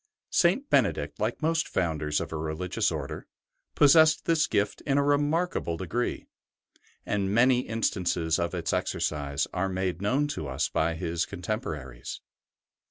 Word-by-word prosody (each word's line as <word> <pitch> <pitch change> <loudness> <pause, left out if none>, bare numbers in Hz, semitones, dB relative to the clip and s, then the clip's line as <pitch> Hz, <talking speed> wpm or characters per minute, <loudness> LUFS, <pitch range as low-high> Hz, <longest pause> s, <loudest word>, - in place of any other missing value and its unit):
St. 190 +12 +3
Bene - - +4
dict, - - -7
like - - -2
most 160 0 +1
founders 75 -4 -1
of - - -5
a - - -2
religious 80 +3 -1
Order, - - -5 0.5
possessed 155 +2 +6
this 165 -2 +2
gift 100 0 0
in 140 -1 +2
a 140 - +4
remarkable 145 - +1
degree, 110 +8 -2 0.8
and 100 -1 -1
many 125 +3 +4
instances 90 -8 0
of 85 +1 -1
its 85 -2 -2
exercise 70 -2 -1
are 95 +2 0
made 95 -1 -2
known 130 +8 +1
to 80 - -4
us 65 -1 -1
by 80 +1 0
his 85 0 -2
contemporaries. 85 - -5
95 Hz, 145 wpm, -27 LUFS, -, 0.8 s, possessed